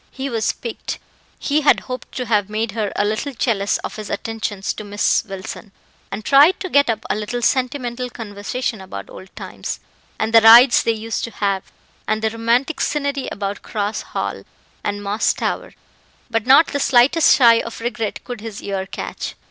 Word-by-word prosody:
He 270 Hz, 0 st, -5 dB
was 225 Hz, -2 st, +1 dB
piqued; 235 Hz, -2 st, -6 dB, 0.4 s
he 300 Hz, +1 st, 0 dB
had 295 Hz, -, +4 dB
hoped 255 Hz, -1 st, -7 dB
to 250 Hz, -, -3 dB
have 210 Hz, -3 st, +1 dB
made 215 Hz, +1 st, -2 dB
her 215 Hz, -2 st, -2 dB
a 205 Hz, -, +1 dB
little 225 Hz, +7 st, -2 dB
jealous 205 Hz, -5 st, +1 dB
of -, -, -5 dB
his 215 Hz, -1 st, -7 dB
attentions 220 Hz, -3 st, -3 dB
to -, -, -8 dB
Miss 205 Hz, 0 st, +1 dB
Wilson, 195 Hz, +1 st, -8 dB, 0.4 s
and 215 Hz, -, -6 dB
tried 290 Hz, +7 st, +6 dB
to 375 Hz, -, -4 dB
get 285 Hz, -3 st, +4 dB
up 220 Hz, -1 st, -1 dB
a -, -, 0 dB
little 215 Hz, +3 st, -3 dB
sentimental 250 Hz, -1 st, 0 dB
conversation 220 Hz, 0 st, -4 dB
about 100 Hz, -, -8 dB
old 190 Hz, -, -11 dB
times, -, -, -6 dB, 0.4 s
and 220 Hz, +1 st, -2 dB
the 225 Hz, -, +8 dB
rides 235 Hz, +3 st, +8 dB
they 230 Hz, -, +1 dB
used 225 Hz, 0 st, -4 dB
to -, -, -7 dB
have, 200 Hz, -3 st, -2 dB, 0.4 s
and 215 Hz, +1 st, 0 dB
the 220 Hz, -, +1 dB
romantic 235 Hz, +7 st, 0 dB
scenery 280 Hz, -2 st, -1 dB
about 200 Hz, 0 st, -4 dB
Cross 210 Hz, 0 st, -3 dB, 0.2 s
Hall -, -, -3 dB, 0.4 s
and 205 Hz, 0 st, -3 dB
Moss 205 Hz, +2 st, +1 dB
Tower, -, -, -3 dB, 0.6 s
but 225 Hz, 0 st, -1 dB
not 280 Hz, +5 st, +7 dB
the 285 Hz, -, -2 dB
slightest 270 Hz, +5 st, +4 dB
sigh 235 Hz, -4 st, +6 dB
of 230 Hz, -, -7 dB
regret 230 Hz, -2 st, -3 dB
could 245 Hz, -4 st, -7 dB
his 220 Hz, -2 st, -7 dB
ear 195 Hz, -1 st, -3 dB
catch. -, -, -6 dB
225 Hz, 180 wpm, -20 LUFS, 205-250 Hz, 0.6 s, the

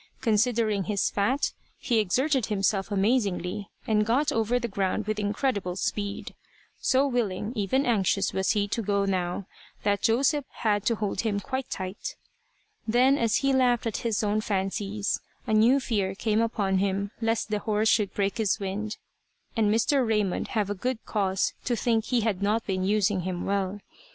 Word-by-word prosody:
Considering 220 Hz, -3 st, +2 dB
his 205 Hz, -2 st, 0 dB
fat, 245 Hz, +8 st, 0 dB, 0.2 s
he 235 Hz, -4 st, +1 dB
exerted 260 Hz, +5 st, +1 dB
himself 195 Hz, -1 st, 0 dB
amazingly, 200 Hz, -2 st, 0 dB, 0.2 s
and 210 Hz, -1 st, +2 dB
got 255 Hz, +7 st, +2 dB
over 225 Hz, +2 st, +1 dB
the 240 Hz, -1 st, -2 dB
ground 195 Hz, 0 st, -1 dB
with 215 Hz, 0 st, -2 dB
incredible 205 Hz, -3 st, -1 dB
speed. 200 Hz, +1 st, -3 dB, 0.5 s
So 270 Hz, +1 st, +3 dB
willing, 230 Hz, -5 st, -1 dB
even 245 Hz, +6 st, +1 dB
anxious, 200 Hz, -4 st, +1 dB
was 190 Hz, +2 st, +1 dB
he 205 Hz, -2 st, +1 dB
to 230 Hz, -, -1 dB
go 200 Hz, -1 st, +1 dB
now, 185 Hz, 0 st, -1 dB, 0.4 s
that 205 Hz, -1 st, +1 dB
Joseph 275 Hz, +5 st, +2 dB
had 205 Hz, -2 st, -1 dB
to 230 Hz, -, +3 dB
hold 205 Hz, -3 st, -2 dB
him 210 Hz, -3 st, 0 dB
quite 260 Hz, +3 st, -4 dB
tight. 190 Hz, -, -5 dB, 0.7 s
Then 250 Hz, +5 st, +4 dB
as 230 Hz, -5 st, +1 dB
he 275 Hz, -, +3 dB
laughed 245 Hz, -2 st, +3 dB
at 225 Hz, -, -1 dB
his 225 Hz, -2 st, -1 dB
own 210 Hz, +1 st, +1 dB
fancies, 200 Hz, 0 st, -1 dB, 0.3 s
a -, -, -1 dB
new 230 Hz, +6 st, +5 dB
fear 200 Hz, -7 st, -1 dB
came 215 Hz, +1 st, +1 dB
upon 200 Hz, -4 st, 0 dB
him 200 Hz, +1 st, -1 dB
lest 225 Hz, -1 st, 0 dB
the 210 Hz, -, +1 dB
horse 215 Hz, 0 st, 0 dB
should 210 Hz, -3 st, +3 dB
break 200 Hz, +3 st, -1 dB
his 215 Hz, 0 st, +1 dB
wind, 205 Hz, +2 st, -4 dB, 0.6 s
and 215 Hz, -3 st, +2 dB
Mr. 255 Hz, +5 st, +3 dB
Raymond 210 Hz, -5 st, 0 dB
have 205 Hz, -2 st, -1 dB
good 255 Hz, +3 st, -1 dB
cause 195 Hz, -3 st, 0 dB
to 245 Hz, -, +1 dB
think 230 Hz, -1 st, +1 dB
he 245 Hz, -2 st, +1 dB
had 210 Hz, -4 st, -1 dB
not 215 Hz, +3 st, +1 dB
been 185 Hz, -2 st, -1 dB
using 205 Hz, 0 st, +2 dB
him 180 Hz, 0 st, -3 dB
well. 195 Hz, 0 st, -1 dB
210 Hz, 170 wpm, -27 LUFS, 200-230 Hz, 0.7 s, new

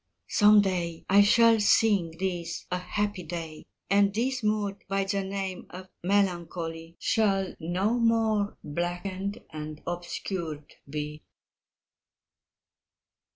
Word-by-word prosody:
Some 210 Hz, 0 st, +6 dB
day 175 Hz, -4 st, -2 dB
I 200 Hz, +1 st, +8 dB
shall 230 Hz, +2 st, +5 dB
think 205 Hz, -6 st, +3 dB
this 175 Hz, -2 st, -3 dB
a 180 Hz, -, 0 dB
happy 205 Hz, +1 st, -2 dB
day, 165 Hz, -2 st, -7 dB, 0.2 s
And 200 Hz, 0 st, +4 dB
this 250 Hz, +5 st, -1 dB
mood 210 Hz, -2 st, -1 dB
by 195 Hz, 0 st, 0 dB
the 195 Hz, 0 st, -1 dB
name 190 Hz, -1 st, -4 dB
of 185 Hz, +1 st, -10 dB
melancholy 170 Hz, -4 st, -1 dB
Shall 195 Hz, -4 st, +1 dB
no 185 Hz, +8 st, 0 dB
more 225 Hz, -3 st, +2 dB
blackened 180 Hz, +6 st, -3 dB
and 155 Hz, -1 st, -6 dB
obscured 175 Hz, -3 st, -5 dB, 0.2 s
be. 150 Hz, +1 st, -5 dB
190 Hz, 110 wpm, -28 LUFS, 170-205 Hz, 0.2 s, I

